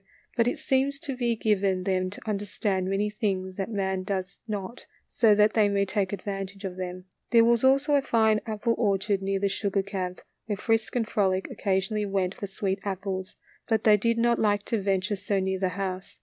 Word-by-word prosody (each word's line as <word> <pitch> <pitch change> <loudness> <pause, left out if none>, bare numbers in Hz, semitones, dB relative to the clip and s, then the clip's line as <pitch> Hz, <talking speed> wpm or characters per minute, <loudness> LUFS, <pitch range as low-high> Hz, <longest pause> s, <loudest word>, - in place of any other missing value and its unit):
But 235 -1 +3
it 245 - 0
seems 275 +1 +1
to 275 - -4
be 240 -2 0
given 200 -4 +1
them 185 -1 0
to 205 - -11
understand 200 -2 -1
many 195 +2 +1
things 190 -4 -2
that 195 +1 -2
man 190 -3 -1
does 190 0 -4
not, 210 +2 -5 0.2
so 220 -3 +5
that 210 +1 +4
they 210 -2 +4
may 200 0 +2
take 195 -1 -1
advantage 195 0 -5
of 185 -1 -4
them. 180 0 -6 0.2
There 230 -1 +6
was 235 0 +3
also 275 +3 +4
a 285 - +5
fine 220 -4 +3
apple 220 +2 0
orchard 200 -2 +1
near 195 0 0
the 200 - +1
sugar 195 0 -1
camp, 185 -2 -4 0.3
where 205 -2 -2
Frisk 225 +2 0
and 230 -3 +1
Frolic 190 -3 +1
oc - - -9
casionally 200 +1 0
went 190 -1 0
for 200 - -6
sweet 195 0 -2
apples; 190 -1 -4 0.3
but 220 -2 +1
they 215 -1 +7
did 230 +3 +1
not 235 0 +2
like 205 -1 +2
to 225 -1 -1
venture 195 +1 0
so 195 0 -1
near 190 0 -1
the 185 -1 +1
house. 185 0 -5
200 Hz, 205 wpm, -27 LUFS, 190-220 Hz, 0.3 s, they